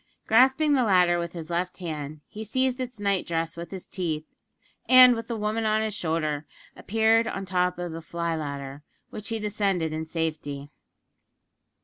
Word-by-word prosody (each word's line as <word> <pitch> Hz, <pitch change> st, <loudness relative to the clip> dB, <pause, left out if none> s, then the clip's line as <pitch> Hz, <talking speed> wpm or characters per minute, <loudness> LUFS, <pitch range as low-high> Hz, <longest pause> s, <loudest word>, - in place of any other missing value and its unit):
Grasping 265 Hz, +6 st, +4 dB
the 260 Hz, -3 st, +3 dB
latter 180 Hz, -5 st, +4 dB
with 170 Hz, 0 st, -4 dB
his 165 Hz, -1 st, -7 dB
left 180 Hz, +1 st, -2 dB
hand, 155 Hz, -4 st, -6 dB
he 215 Hz, -, -7 dB
seized 260 Hz, +3 st, 0 dB
its 250 Hz, -3 st, -6 dB
night 200 Hz, -2 st, 0 dB
dress 165 Hz, 0 st, -2 dB
with 170 Hz, 0 st, -7 dB
his 190 Hz, -2 st, -8 dB
teeth, 160 Hz, -4 st, -3 dB, 0.6 s
and, 255 Hz, -1 st, +9 dB
with 230 Hz, 0 st, -6 dB
the 235 Hz, -, -3 dB
woman 215 Hz, +1 st, -1 dB
on 215 Hz, 0 st, +2 dB
his 215 Hz, -1 st, -2 dB
shoulder, 160 Hz, -5 st, -2 dB, 0.3 s
appeared 225 Hz, +1 st, +2 dB
on 195 Hz, -, -3 dB
the 190 Hz, -, -13 dB
top 180 Hz, -1 st, +1 dB
of 175 Hz, -1 st, -4 dB
the 165 Hz, +1 st, -6 dB
fly 170 Hz, +1 st, -3 dB
ladder, 140 Hz, -2 st, -5 dB, 0.3 s
which 215 Hz, +2 st, -6 dB
he 225 Hz, -, -1 dB
descended 200 Hz, -6 st, -1 dB
in 160 Hz, 0 st, -4 dB
safety. 150 Hz, -3 st, -4 dB
180 Hz, 175 wpm, -26 LUFS, 160-220 Hz, 0.6 s, and